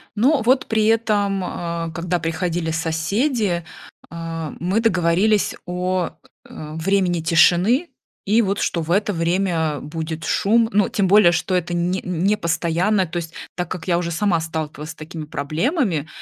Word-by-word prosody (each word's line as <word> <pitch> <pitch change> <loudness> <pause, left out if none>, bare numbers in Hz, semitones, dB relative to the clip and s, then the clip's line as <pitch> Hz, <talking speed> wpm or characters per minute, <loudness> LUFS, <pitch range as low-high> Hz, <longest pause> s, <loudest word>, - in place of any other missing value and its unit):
Но 265 +7 +3
вот 260 +3 +3
при 220 -1 +1
этом, 210 -3 +1
э, 170 -2 -4
когда 175 +1 -1
приходили 165 0 -2
соседи, 175 - 0 0.5
э, 165 -2 -5
мы 185 +5 0
договорились 200 0 +2
о, 180 0 -1 0.4
э, 150 0 -8
времени 175 0 +1
тишины, 180 - +3 0.4
и 215 +4 +4
вот, 200 -2 -1
что 170 - 0
в 160 - -7
это 205 +2 +2
время 165 -3 0
будет 160 +1 -5
шум. 225 +7 +2
Ну, 205 0 +3
тем 200 -2 +1
более, 195 -2 +6
что 180 +2 -1
это 175 -1 0
не 180 +2 0
не 180 +4 +1
постоянно, 170 +4 +1
то 175 +1 -5
есть 165 -1 -5 0.2
так 180 - -3
как 180 - -6
я 175 -1 +2
уже 175 -1 -3
сама 170 0 +1
сталкивалась 155 -1 -5
с - - -12
такими 155 0 -8
проблемами, 165 - -1
175 Hz, 155 wpm, -21 LUFS, 165-200 Hz, 0.5 s, более